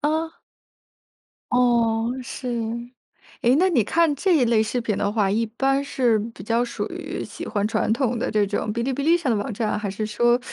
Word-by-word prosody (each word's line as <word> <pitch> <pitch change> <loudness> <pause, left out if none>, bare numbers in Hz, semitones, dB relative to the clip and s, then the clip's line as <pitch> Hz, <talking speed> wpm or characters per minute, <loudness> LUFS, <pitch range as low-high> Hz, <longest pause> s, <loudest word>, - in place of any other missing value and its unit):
嗯。 315 +2 0 1.2
哦， 235 -2 +2
是。 255 +1 -7 1.0
诶 245 +2 +4
那 365 +5 +4
你 255 - +3
看 330 +7 +2
这 365 +5 +2
一 285 - +4
类 230 -2 +3
视 225 +3 -2
频 220 -3 -1
的 200 - 0
话， 210 -2 +1
一 220 +4 +1
般 270 +5 0
是 250 -5 +2 0.2
比 - - -11
较 230 +3 +1
属 245 - -4
于 - - -5
喜 - - -8
欢 205 -2 -1
传 220 -1 0
统 245 -1 0
的 235 - -2
这 210 -1 +2
种 210 +1 -2
哔 235 +1 -2
哩 265 +2 -1
哔 280 - -3
哩 330 +3 +4
上 310 -8 -1
的 220 - +1
网 245 +1 -4
站， 215 +1 -1
还 210 -1 -3
是 205 +3 -3
说 240 +3 +2
235 Hz, 220 characters per minute, -23 LUFS, 220-270 Hz, 1.2 s, 诶